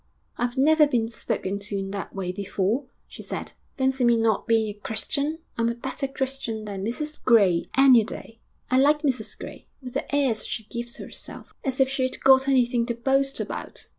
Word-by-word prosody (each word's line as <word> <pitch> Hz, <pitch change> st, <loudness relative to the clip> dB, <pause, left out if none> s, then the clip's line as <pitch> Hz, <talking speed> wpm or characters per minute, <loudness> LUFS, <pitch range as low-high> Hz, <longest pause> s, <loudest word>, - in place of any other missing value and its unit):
'I've 245 Hz, +2 st, -2 dB
never 305 Hz, +2 st, +5 dB
been 235 Hz, -5 st, +1 dB
spoken 200 Hz, -3 st, -3 dB
to 200 Hz, 0 st, -4 dB
in 195 Hz, 0 st, -4 dB
that 200 Hz, 0 st, -6 dB
way 185 Hz, -2 st, -2 dB
before,' 200 Hz, +6 st, -1 dB, 0.2 s
she -, -, -10 dB
said. -, -, -5 dB, 0.3 s
'Fancy 265 Hz, -1 st, +1 dB
me 235 Hz, -1 st, +5 dB
not 225 Hz, -2 st, +1 dB
being 225 Hz, -1 st, +3 dB
a -, -, -5 dB
Christian! 280 Hz, +9 st, -1 dB, 0.2 s
I'm 230 Hz, 0 st, +2 dB
a 235 Hz, -, -2 dB
better 265 Hz, +3 st, -4 dB
Christian 265 Hz, -5 st, -3 dB
than 195 Hz, -2 st, -5 dB
Mrs 300 Hz, +8 st, -4 dB
Gray, 200 Hz, -8 st, +4 dB
any 260 Hz, -4 st, +7 dB
day. 225 Hz, +1 st, -8 dB, 0.3 s
I 255 Hz, -, +5 dB
like 295 Hz, +3 st, +4 dB
Mrs 255 Hz, -7 st, -1 dB
Gray, -, -, -10 dB
with 255 Hz, -3 st, -9 dB
the -, -, -2 dB
airs 265 Hz, -6 st, +2 dB
she 220 Hz, -, -4 dB
gives 235 Hz, +2 st, -6 dB
herself -, -, -8 dB
as 265 Hz, -2 st, -2 dB
if 265 Hz, -, +5 dB
she'd 260 Hz, -1 st, -1 dB
got 265 Hz, 0 st, +6 dB
anything 245 Hz, -3 st, +2 dB
to 235 Hz, -, -1 dB
boast 270 Hz, +3 st, +1 dB
about!... -, -, -6 dB
240 Hz, 190 wpm, -25 LUFS, 220-270 Hz, 0.3 s, any